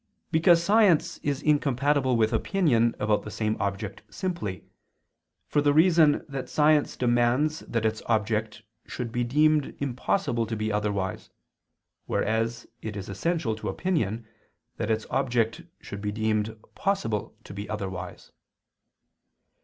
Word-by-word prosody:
Because 170 +1 +5
science 200 -4 +3
is 145 0 -2
incompatible 140 -3 +2
with 110 0 +2
opinion 120 - +2
about 105 -1 +1
the - - -8
same 110 0 -1
object 100 0 -3
simply, 155 - -4 0.8
for 145 - +1
the 145 0 +3
reason 160 -2 +5
that 135 -2 -5
science 150 -1 +3
demands 125 +6 +2
that 115 -2 -3
its 110 0 0
object 110 0 0 0.2
should 120 -3 -5
be 120 +1 0
deemed 150 +4 +2
impossible 125 - -1
to 110 - -3
be 110 0 -2
otherwise, 100 -3 -2 0.8
whereas 115 +2 -1 0.2
it 110 -2 -5
is 100 - -6
essential 160 - -1
to 110 - -5
opinion, 115 - -1 0.5
that 105 - -2
its 110 0 0
object 120 +4 0 0.2
should 100 - -8
be 105 0 -2
deemed 110 0 -1
possible 195 - -2
to - - -10
be 100 +1 -6
otherwise. 95 -4 -6
115 Hz, 130 wpm, -27 LUFS, 110-150 Hz, 0.8 s, Because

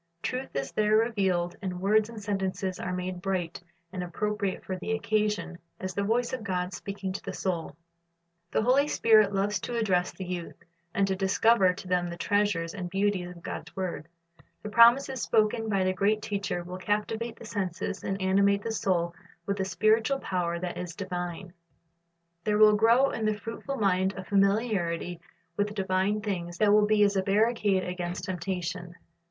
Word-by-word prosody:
Truth 255 - -3
is 135 0 -2
there 215 0 +3
revealed, 190 -6 +1
and 185 -2 -4
words 210 +3 +3
and 230 -2 -8
sentences 190 -2 -2
are 180 - -3
made 180 0 -4
bright 180 -4 -2 0.3
and 185 - -3
appropriate 200 +2 -2
for 185 - -3
the 190 +4 -3
occasion, 210 -5 -1 0.2
as 185 0 -4
the 200 - -1
voice 235 +5 0
of 255 -4 -3
God 180 -3 -2
speaking 195 +1 -5
to - - -6
the - - -5
soul. 170 -6 -3 0.7
The 220 - +1
Holy 265 +5 +4
Spirit 215 -7 +4
loves 200 0 0
to 240 +5 -4
address 185 -6 +1
the 190 - -7
youth, 175 -1 -5 0.4
and 195 +2 +1
to 190 - 0
discover 195 +1 +4
to 190 - -9
them 180 -1 +1
the 170 - -6
treasures 190 -4 0
and 185 -3 -5
beauties 195 -1 0
of 175 -1 -12
God's - - -7
word. 180 -4 -4 0.6
The 210 - -4
promises 240 +3 +5
spoken 220 +1 +1
by 195 -2 +2
the 185 0 +1
great 210 +3 +1
Teacher 200 -3 -2
will 180 +1 -7
captivate 220 +4 -2
the - - -11
senses 195 -2 -3
and 195 0 -2
animate 200 +1 +3
the 230 - -2
soul 175 -5 0 0.3
with 200 +1 -2
a 190 - 0
spiritual 220 +7 +2
power 180 -7 -2
that 175 0 -4
is 175 -2 -6
divine. 175 0 -5 0.9
There 210 -1 +1
will 215 0 +7
grow 235 +6 +4
in 225 - -3
the 215 0 +1
fruitful 230 +6 -5
mind 190 -2 +1
a 190 - -5
familiarit}' 195 -4 +1 0.4
with 205 0 -1
divine 195 +1 0
things 175 -4 -4
that 205 +1 +4
will 210 0 +5
be 215 -1 +4
as 200 0 +3
a 190 - +3
barricade 205 -1 +2
against 180 0 -4
temptation. 180 -1 -4
195 Hz, 180 wpm, -28 LUFS, 180-215 Hz, 0.9 s, will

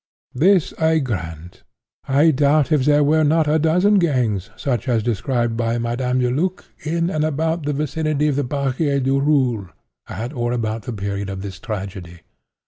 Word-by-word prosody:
This 175 +5 +3
I 160 0 +3
grant. 90 - -5 0.5
I 145 +4 +4
doubt 145 +1 +2
if 145 -4 +3
there 150 0 +4
were 155 +2 +3
not 155 +1 +2
a 155 +2 +2
dozen 180 +6 +3
gangs, 125 - 0
such 130 -5 -2
as 115 -3 +1
described 120 +1 -1
by 115 0 -1
Madame 125 +2 -1
Deluc, 145 +10 -1 0.2
in 170 +3 -1
and 155 -3 0
about 160 +1 -1
the 150 - 0
vicinity 150 +1 -1
of 145 - +1
the 145 - 0
Barrière 140 +1 -1
du 135 +1 +2
Roule 130 -9 +1 0.4
at 120 +5 -5
or 120 -2 -1
about 110 -2 -3
the - - -2
period 100 -1 -4
of 95 0 -6
this 95 -2 -7
tragedy. 95 -5 -7
135 Hz, 170 wpm, -20 LUFS, 115-155 Hz, 0.5 s, I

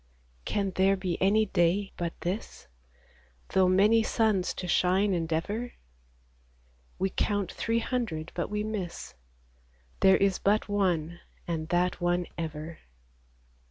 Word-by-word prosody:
Can 200 -2 -1
there 190 +1 +3
be 185 -2 -3
any 210 +3 +4
day 190 +1 +1
but 170 -1 -4
this, 180 - -5 0.8
Though 190 -1 +3
many 205 +5 +5
suns 215 -4 +1
to 180 - -5
shine 190 +3 +2
endeavor? 175 +8 -2 1.2
We 190 0 -1
count 205 -1 -1
three 230 0 -1
hundred, 185 -11 -3
but 170 - -3
we 210 0 -2
miss: 205 -5 -5 0.9
There 190 0 +6
is 195 -1 +1
but 210 +2 +2
one, 175 -5 0 0.3
and 160 -2 -3
that 180 +1 +1
one 175 0 +1
ever. 160 0 -6
190 Hz, 125 wpm, -28 LUFS, 175-205 Hz, 1.2 s, There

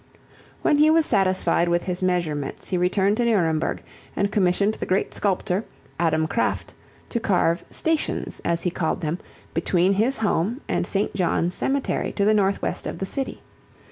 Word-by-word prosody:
When 295 - +3
he 305 +1 +6
was 320 0 +4
satisfied 185 -4 +2
with 170 0 +1
his 180 -1 -3
measurements 170 -6 -1
he - - 0
returned 195 +3 +2
to 240 - +1
Nuremberg 165 -9 +1 0.3
and 200 0 0
commissioned 200 +1 +2
the - - -5
great 185 +2 0
sculptor, 190 0 0 0.4
Adam 160 -2 +2
Kraft, 195 +9 -1 0.4
to 235 - -1
carve 175 -5 +1
"stations," 320 -1 -1
as 170 0 0
he 180 - 0
called 165 0 -2
them, 165 +2 -2 0.3
between 175 +3 +2
his 230 +7 +2
home 215 +2 0
and - - -1
St. 200 +1 0
John's 180 -1 0
Cemetery 275 +6 -1
to 200 - +1
the 215 - +4
northwest 200 -2 0
of - - -5
the 190 - -3
city. 270 +7 -4
190 Hz, 165 wpm, -23 LUFS, 175-215 Hz, 0.4 s, he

